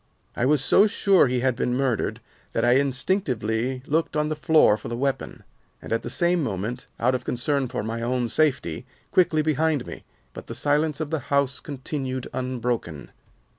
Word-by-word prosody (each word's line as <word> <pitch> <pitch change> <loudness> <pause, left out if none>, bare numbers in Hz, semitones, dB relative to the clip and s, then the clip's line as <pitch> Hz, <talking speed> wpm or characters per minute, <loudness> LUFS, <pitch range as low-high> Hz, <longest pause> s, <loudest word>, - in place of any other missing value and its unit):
"I 125 - +1
was 145 -2 +3
so 210 - +6
sure 195 -5 +4
he 125 0 0
had 130 -1 +1
been 125 0 -1
murdered 130 -4 -1 0.3
that - - +1
I 120 - +4
instinctively 130 - 0
looked 160 +1 0
on 150 0 +1
the 155 - -1
floor 155 -7 +4
for - - -8
the 120 - -4
weapon, 135 +1 -3 0.4
and, - - -5
at 115 - 0
the 120 - -6
same 175 +6 +2
moment, 115 0 -3
out 125 +2 +2
of 130 0 -2
concern 135 +2 0
for 125 -3 -4
my 115 +1 -4
own 120 +1 0
safety, 130 - 0 0.2
quickly 170 -5 +3
behind 155 -2 +1
me; - - -9 0.3
but - - -10
the - - -6
silence 150 +1 +1
of 155 -1 -4
the 160 - 0
house 140 -1 +1
continued 130 -2 -4
unbroken. 120 - -3
130 Hz, 180 wpm, -24 LUFS, 120-150 Hz, 0.4 s, so